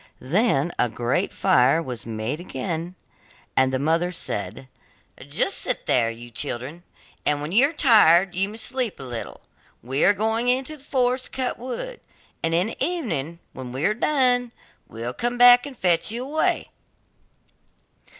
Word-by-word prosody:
Then 170 - +1
a 120 - +2
great 120 +2 -1
fire 130 +5 +3
was 125 -8 -6
again 115 - -5
made, 160 +7 -4 0.6
and 130 0 +3
the 130 - 0
mother 165 +5 +1
said: 110 - -4 0.6
'Just - - 0
sit - - -3
there, 115 -2 +2
you 120 +1 -9
children, 130 +8 -4 0.4
and 150 0 +1
when 150 +2 -5
you 250 +9 +5
are - - -7
tired 195 - +5
you 195 +2 0
may 215 - -9
sleep 250 -1 -1
a - - -7
little; 120 -3 -7 0.4
we 130 +4 -1
are 205 - +6
going 220 +4 -1
into 260 +4 0
the 280 - -16
forest 255 -2 0
to - - -8
cut 255 -2 -2
wood, 260 - -6 0.4
and 165 0 0
in 175 +2 +2
the 225 - -4
evening 215 - -2 0.2
when 130 -2 -8
we 130 +5 -2
are 210 - +3
done, 245 -1 +2 0.4
we 115 - -10
will 120 +2 -3
come 240 - -3
and 245 +2 +6
fetch 175 +1 +2
you 240 +2 -4
away. 300 +4 -1
175 Hz, 165 wpm, -23 LUFS, -, 0.6 s, are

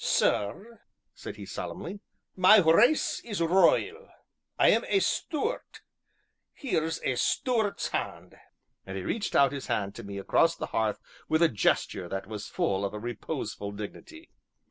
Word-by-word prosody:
"Sir," 205 - 0 0.3
said - - -8
he - - -9
solemnly, 200 - -6 0.4
"my 185 +3 +7
race 210 - +4
is 210 -5 -5
royal 190 - +2 0.5
I - - +5
am - - +3
a 395 - +3
Stuart 400 - -2 0.7
here's 165 - -2
a 130 - 0
Stuart's 225 - 0
hand," - - -4 0.5
and 95 0 -7
he 95 - -4
reached 215 - -2
out 140 -2 +5
his 140 -2 -6
hand 100 -5 -1
to - - -9
me 100 0 -7
across 165 +11 +2
the - - -4
hearth 110 -2 0 0.3
with 160 +2 +3
a 165 - +5
gesture 105 - 0
that 95 0 -4
was 105 -2 -7
full 95 0 -1
of 100 +1 -3
a - - -5
reposeful 105 -3 -5
dignity. 320 - -9
160 Hz, 150 wpm, -28 LUFS, -, 0.7 s, my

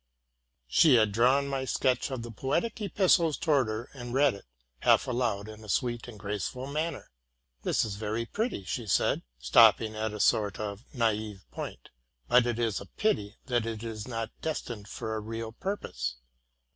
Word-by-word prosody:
"' - - -51 0.3
She 125 - +6
had 110 -3 +4
drawn 130 +6 +3
my 135 -1 -2
sketch 130 0 +1
of 130 -4 -4
the 120 - -7
poetic 170 - -1
epistle 185 -4 +3
towards 145 -6 +2
her, 110 +3 -4
and 120 -2 -6
read 140 0 +5
it 100 - -11 0.3
half - - +4
aloud 120 -5 -1
in 110 0 -10
a 105 - -11
sweet 120 +2 0
and 115 -3 -9
graceful 105 +5 -4
man 155 +4 -1
ner. - - -12 0.5
'*That - - +1
is 100 -2 -5
very 110 +2 -2
pretty,'' 210 - -2 0.2
said 90 - +2 0.2
she, 65 - -15
stopping 110 - +6
at 110 0 -2
a 105 - -6
sort 105 -1 +2
of 105 +1 -5
naive 110 -5 -1
point; - - -7 0.4
but 125 - +5
it 120 -2 -1
is 115 -3 0
a - - -10
pity 105 - -1
that 120 -3 0
it 110 -1 -4
is 110 -1 -5
not 115 -2 -3
destined 120 -9 -4
for 110 +1 -4
a 110 - -1
real 115 +1 -5
purpose. 65 - -3
115 Hz, 185 wpm, -29 LUFS, 105-130 Hz, 0.5 s, She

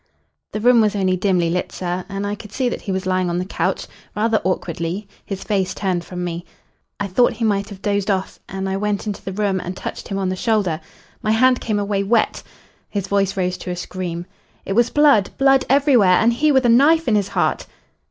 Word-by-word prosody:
"The 215 - -3
room 240 +1 +5
was 215 -1 +2
only 190 -2 +1
dimly 180 -3 +1
lit, 180 +1 -2
sir, 180 0 -3
and 200 0 -3
I 205 - -2
could 210 0 -9
see 255 0 0
that - - -5
he 200 - -4
was 190 0 -2
lying 185 -1 +1
on 170 - -1
the 180 - -2
couch, 190 - -2 0.3
rather 220 +1 +1
awkwardly, 180 +1 -2 0.2
his 195 -2 -6
face 190 -3 -1
turned 185 -4 -1
from 180 0 -6
me. 175 -1 -4 0.6
I 205 - -1
thought 200 +6 +2
he 230 - -2
might 200 -1 0
have 195 -2 -11
dozed 200 -1 0
off, 190 -1 -1
and 190 0 -4
I 190 0 -1
went 210 +1 -1
into 210 -2 -5
the 195 - -4
room 195 -1 0
and 185 +1 -6
touched - - -6
him 195 - -3
on 190 -1 -1
the 185 - -1
shoulder. 195 -6 0 0.4
My 215 - -2
hand 250 +3 +4
came 215 -2 -1
away 200 -1 0
wet!" 220 +3 +1 0.5
His 200 -3 -2
voice 195 -1 0
rose 180 -1 -1
to - - -7
a 180 - -2
scream. 175 -1 -5 0.4
"It 195 - -2
was 240 +3 +3
blood 285 -9 +4
blood 270 -1 +4
everywhere 255 -10 +5
and 230 +1 +3
he 300 +6 +2
with 265 -2 +3
a - - +5
knife 295 +8 +5
in 230 - +3
his 205 -2 +2
heart." - - -1
200 Hz, 225 wpm, -20 LUFS, 185-225 Hz, 0.6 s, room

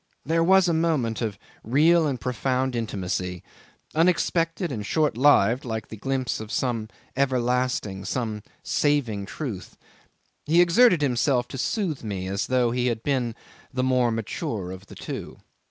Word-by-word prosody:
There 165 +3 +2
was 190 +1 +5
a 170 - +2
moment 155 -9 0
of 110 -4 -2 0.3
real 155 +7 +4
and 135 -4 -2
profound 130 +1 -1
intimacy, 90 -5 -3 0.5
unexpected 170 0 +1
and 110 -5 -4
short 150 +3 +1
lived 125 -2 +4
like 110 -3 -5
a - - -5
glimpse 130 +3 -2
of 110 0 -7
some 115 -4 -1 0.3
everlasting, 125 -6 0
of 95 - -7
some 110 -2 -2 0.2
saving 120 -10 0
truth. 115 - -6 0.7
He 165 +3 +4
exerted 175 0 +5
himself 125 -1 +1
to - - -6
soothe 175 - -1
me 100 -4 -4
as 100 +3 -2
though 125 -2 +2
he 125 +1 0
had 115 -2 -2
been 125 -5 0 0.4
the 130 -1 -1
more 125 -2 +3
mature 115 - -3
of 95 +2 -10
the - - -12
two. - - -7
125 Hz, 155 wpm, -25 LUFS, 110-150 Hz, 0.7 s, was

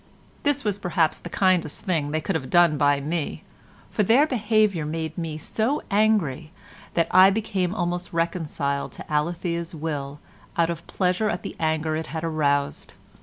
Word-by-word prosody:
This 285 -1 +1
was 205 -2 -1
perhaps 170 -4 +1
the 175 - -8
kindest 180 -5 +1
thing 160 -6 0
they 155 +1 -1
could 195 - -2
have 135 -6 -3
done 175 -3 +5
by 145 -1 +3
me, 155 +2 -3 0.5
for - - 0
their 230 +8 +5
behaviour 215 - +1
made 160 +1 -4
me 165 -3 -4
so 225 - -1
angry 195 -8 +2 0.4
that 165 -1 +3
I 185 +1 +8
became 195 -3 -1
almost 175 -2 -2
reconciled 155 -4 -2
to - - -9
Alethea's 170 +2 -1
will 145 -2 -4 0.4
out 170 0 +3
of 170 0 -7
pleasure 185 +3 0
at 180 - -3
the - - -6
anger 155 -1 0
it 160 +1 -3
had 160 0 -5
aroused. 145 -3 0
170 Hz, 165 wpm, -24 LUFS, 155-190 Hz, 0.5 s, I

